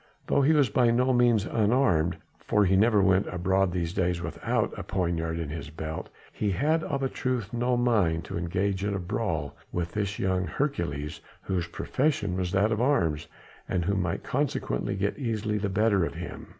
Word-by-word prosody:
Though 140 - +2
he 145 +4 +4
was 145 -4 +4
by 120 +2 +4
no 125 +2 +3
means 120 -4 +3
unarmed 105 -8 +2 0.2
for 105 -1 +2
he 95 +1 +3
never 105 0 +4
went 95 0 +3
abroad 95 +1 +1
these 85 -1 -2
days 90 -2 0
without 85 -1 -1
a - - -5
poniard 85 -3 -1
in 80 -3 -3
his 75 -1 -6
belt 80 +1 -6 0.2
he 105 - -1
had, 155 - +1
of 140 -1 -2
a - - +2
truth, 125 -5 -3
no 120 +1 +1
mind 100 -10 +2
to - - -6
engage 95 +3 -1
in 100 -1 0
a - - -2
brawl 85 -7 -2 0.2
with 85 -1 -2
this 105 0 -2
young 95 -1 0
Hercules 80 - -2 0.2
whose 90 -3 -1
profession 105 - -1
was 90 -1 -2
that 100 +3 +2
of 110 +1 0
arms 85 - +1 0.4
and 85 -2 0
who 100 - +1
might 90 -3 -1
consequently 125 - -1
get 100 +6 -1
easily 110 -4 -1
the 100 0 -1
better 100 -1 +2
of - - -3
him. - - -7
95 Hz, 190 wpm, -27 LUFS, 85-115 Hz, 0.4 s, he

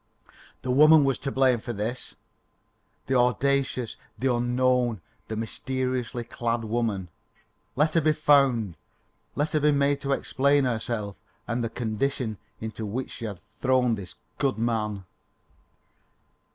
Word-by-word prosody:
The 130 - -1
woman 155 +3 +7
was 135 -1 +1
to 140 - -3
blame 130 -3 +3
for 120 +2 -5
this 115 +4 -4 0.9
the 135 - -1
audacious, 130 0 +1 0.2
the 130 -1 +1
unknown, 120 -1 +1 0.3
the 110 - -4
mysteriously 125 +2 -2
clad 115 0 -2
woman. 110 -5 -1 0.7
Let 150 +4 +2
her 165 - +4
be 155 0 +3
found. 135 - +3 0.6
Let 145 +2 -1
her 155 - +3
be 150 0 +4
made 140 0 +2
to 140 0 0
explain 140 +1 +2
herself 110 -4 -2 0.3
and 120 0 -1
the 115 - -1
condition 115 -1 -2 0.2
into 110 0 -5
which 115 +5 -4
she 115 - -6
had 100 -5 -5 0.2
thrown 130 -2 +3
this 95 -6 -6 0.2
good 135 -4 +1
man. 105 -4 -1
125 Hz, 135 wpm, -26 LUFS, 115-135 Hz, 0.9 s, woman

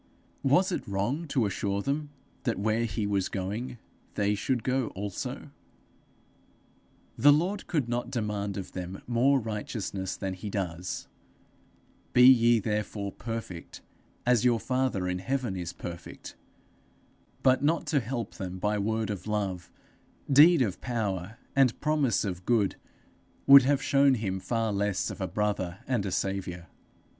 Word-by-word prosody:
Was 180 +8 +3
it - - -3
wrong 120 +12 -1
to 130 -5 +1
assure 100 0 -1
them 145 +1 -2 0.3
that 115 -6 -1
where 110 +3 +1
he 105 -1 -2
was 100 -2 0
going 105 +6 -4 0.4
they 105 0 +1
should 120 +3 -1
go 130 -2 0
also? 100 0 -5 1.7
The 145 - +8
Lord 180 +7 +1
could 150 -8 0
not 120 0 -2
demand 105 -5 -2
of 95 - -6
them 90 +1 -6
more 130 +3 +3
righteousness 105 -3 -4
than 95 -1 -3
he 95 +3 -6
does: 90 -3 -4 1.1
'Be 125 - +6
ye 120 -2 +7
therefore 105 -1 -2
perfect 115 -8 -7 0.4
as 120 -2 +3
your 120 -2 +3
father 125 -8 0
in 90 0 -1
heaven 125 0 -2
is 90 -2 -4
perfect;' 85 -1 -9 1.1
but 130 +1 +4
not 160 +3 +2
to 145 - +2
help 115 -2 -4
them 95 -2 -6
by 105 +2 0
word 110 +1 -1
of 100 0 -6
love, 100 -4 -2 0.6
deed 150 +2 +7
of 100 -6 -3
power, 110 -4 -3 0.2
and 135 -4 +3
promise 145 -9 +1
of 90 -2 -4
good, 110 -5 +2 0.7
would 140 0 +10
have 140 +2 +1
shown 140 -2 +4
him 95 -5 -2
far 115 +1 -1
less 100 -1 0
of - - -8
a 95 - -1
brother 95 -2 -1
and 120 -6 -1
a - - -3
saviour. 95 -3 -2
110 Hz, 145 wpm, -28 LUFS, 95-130 Hz, 1.7 s, would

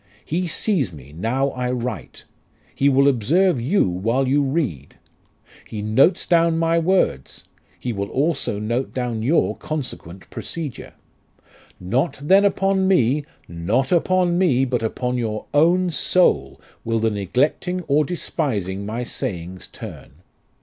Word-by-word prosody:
He 180 +3 -1
sees 165 - 0
me 70 -3 -13
now 125 - 0
I 125 0 -3
write. 125 -2 -5 0.5
He 140 - +2
will 140 +1 +4
observe 140 - +2
you 155 - +2
while 115 +9 0
you 140 +3 +3
read. 135 - -2 0.7
He 105 -2 -5
notes 125 - +3
down 165 -1 +3
my 165 0 +2
words; 165 - 0 0.3
He 125 - -3
will 100 -1 -3
also 140 -6 0
note 115 +5 -2
down 120 -3 -2
your 145 +9 +2
consequent 95 - -6
procedure. 155 -6 -6 0.9
Not 120 - -1
then 190 +8 +4
upon 195 -1 +2
me 145 -5 +2 0.2
not 105 +11 -1
upon 180 0 +2
me, 135 -8 +3
but 125 -2 -1
upon 125 +2 -2
your 110 -2 -3
own 175 +4 +3
soul 110 - +2 0.2
will 115 0 0
the 110 0 +1
neglecting 130 - 0
or 150 0 +2
despising 105 - -3
my 115 +3 -3
sayings 95 -8 -5
turn. - - -10
130 Hz, 135 wpm, -21 LUFS, 110-165 Hz, 0.9 s, will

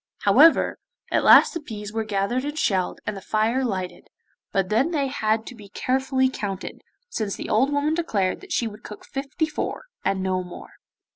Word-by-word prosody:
However, 330 - +5 0.3
at - - +2
last - - +7
the 335 - -3
peas 210 -7 -8
were 225 0 -1
gathered 210 +4 -1
and 295 +1 -4
shelled, 190 - 0
and 210 - -3
the 195 - -7
fire 220 +6 +1
lighted, 185 -7 -4 0.4
but 195 -2 0
then 235 +9 +2
they 295 -5 0
had 220 -4 0
to - - -8
be 210 -4 -13
carefully 260 +3 +1
counted, 205 -6 -5 0.3
since 215 - -3
the - - -6
old 260 +6 +3
woman 290 +2 +1
declared 215 - -1
that 390 -2 -13
she 240 - +1
would 215 0 -10
cook 210 - -10
fifty 275 +3 -2
four, 315 - -4 0.2
and 190 -1 0
no 185 -1 0
more. 180 - -11
220 Hz, 190 wpm, -24 LUFS, 200-270 Hz, 0.4 s, last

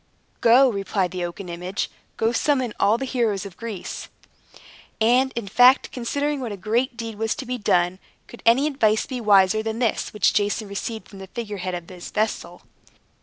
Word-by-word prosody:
"Go," 245 +4 +6
replied 195 -4 -1
the 180 -1 -3
oaken 175 +2 -6
image, 180 +3 -3 0.3
"go, 225 +1 +2
summon 255 -2 +1
all 205 +3 +4
the 270 - -3
heroes 230 -7 0
of 195 -3 -9
Greece." 225 -4 -6 0.9
And, 250 +4 +3
in 235 -4 -4
fact, 245 +6 +5
considering 285 +4 -2
what 245 -4 -4
a 200 - -5
great 235 +6 -1
deed 225 -3 -6
was 225 0 0
to 280 - -6
be 250 0 -3
done, 180 -2 +1 0.3
could 240 - -13
any 240 +5 +4
advice 220 -8 +2
be 255 -2 -5
wiser 205 0 +4
than 220 0 -3
this 235 -3 0
which 210 -2 +2
Jason 205 +1 0
received 220 +3 -5
from 195 - -13
the 190 - -9
figure 210 -1 -6
head 185 -1 -3
of 175 -1 -7
his 180 -2 -9
vessel? 190 -5 -2
220 Hz, 185 wpm, -23 LUFS, 195-245 Hz, 0.9 s, Go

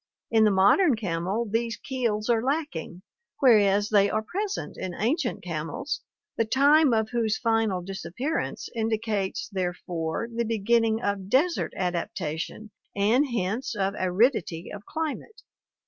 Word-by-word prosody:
In 220 -1 +5
the - - +5
modern 205 - +4
camel 195 +2 -2
these 230 +2 -1
keels 230 -6 -2
are 235 -2 +3
lacking, 265 - -3 0.4
whereas 205 -5 +4
they 205 -2 +4
are 215 +1 -1
present 400 - -4
in 185 -2 -5
ancient 250 - -1
camels, 180 - -4 0.4
the - - +3
time 280 +5 +4
of 220 -1 +1
whose 225 -3 0
final 225 -6 +1
disappearance 195 - -3
indicates 220 -3 -1
therefore 180 -1 -3
the 235 +1 0
beginning 225 +1 +1
of 200 -1 -2
desert 315 - +2
adaptation 175 +2 -3 0.2
and 225 +8 +3
hence 230 0 -2
of 195 -1 0
aridity 185 -3 +1
of 205 0 -9
climate. 320 +8 -5
220 Hz, 130 wpm, -26 LUFS, 190-245 Hz, 0.4 s, In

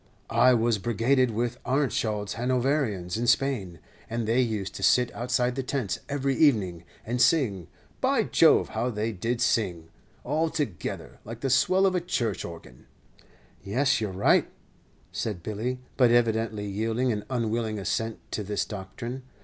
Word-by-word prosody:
"I 125 +2 +6
was 115 -2 +1
brigaded 120 +4 +2
with 120 +2 -2
Arentschild's 110 -6 0
Hanoverians 125 - 0
in 120 +1 -1
Spain; 120 -9 +1 0.3
and 115 -1 -2
they 120 +3 +3
used 105 -5 -2
to - - -8
sit 125 -1 +3
outside 125 +1 0
the 135 - -2
tents 125 -8 -2
every 140 -1 0
evening, 100 - +2 0.2
and 120 +2 -1
sing. 105 - +2 0.3
By - - +2
Jove! - - +4
how 125 - -1
they 110 0 -2
did 115 +4 -2
sing 85 -10 0 0.3
all 155 +5 0
together, 125 - -4
like 115 +2 -8
the 135 - 0
swell 185 +9 +4
of 190 - +3
a 180 - 0
church 120 - -2
organ." 85 -7 -11 0.8
"Yes, 130 +5 +1
you're 105 -3 -2
right," 95 +2 +3 0.6
said 100 -7 -4
Billy, 110 +6 -3 0.2
but 125 -3 +5
evidently 115 -3 +1
yielding 110 +5 -1
an 105 -2 -2
unwilling 115 -3 -1
assent 110 +3 -2
to - - -2
this 105 0 -2
doctrine. 115 +6 -6
115 Hz, 150 wpm, -27 LUFS, 105-130 Hz, 0.8 s, I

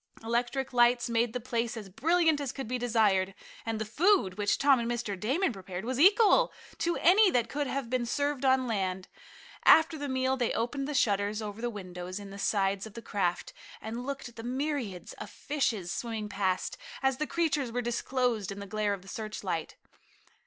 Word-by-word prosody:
Electric 240 +3 -1
lights 240 0 +4
made 235 0 +2
the 250 - -3
place 235 -1 -2
as 210 -3 -7
brilliant 320 - +2
as 275 -3 -2
could 270 -4 -6
be 250 +2 -2
desired, 210 -5 +2 0.3
and 225 -1 -1
the 220 - -2
food, 290 - +2
which 205 0 +1
Tom 275 -2 +4
and 235 0 -2
Mr. 235 -4 -2
Damon 265 - +1
prepared, 190 0 -7
was 255 +1 -2
equal 410 +6 +6 0.3
to 340 0 0
any 390 +4 +6
that 240 -8 +1
could 290 +3 -2
have 270 -2 -3
been 245 0 -1
served 285 +1 -1
on 260 -1 +3
land. 190 -5 -2 0.5
After 320 -1 +6
the 285 -1 -3
meal 260 0 +1
they 245 -3 0
opened 270 +4 -2
the 295 - -3
shutters 205 -3 +1
over 210 0 -6
the 240 - -1
windows 185 -3 -7
in 200 -1 -9
the 200 - -9
sides 195 0 0
of 215 - -15
the 230 - -8
craft, 180 -4 -1 0.3
and 230 +3 -5
looked 275 0 -5
at 240 - -15
the 225 - -7
myriads 250 - -3
of - - -7
fishes 225 -11 -2
swimming 225 -3 -4
past, 195 - -1 0.2
as 265 -1 +2
the 305 +1 -2
creatures 300 -7 0
were 245 +1 -2
disclosed 240 -3 -1
in 195 - -6
the 200 - -6
glare 210 0 -1
of 190 - -14
the - - -16
searchlight. 200 -6 -4
235 Hz, 195 wpm, -29 LUFS, 205-270 Hz, 0.5 s, equal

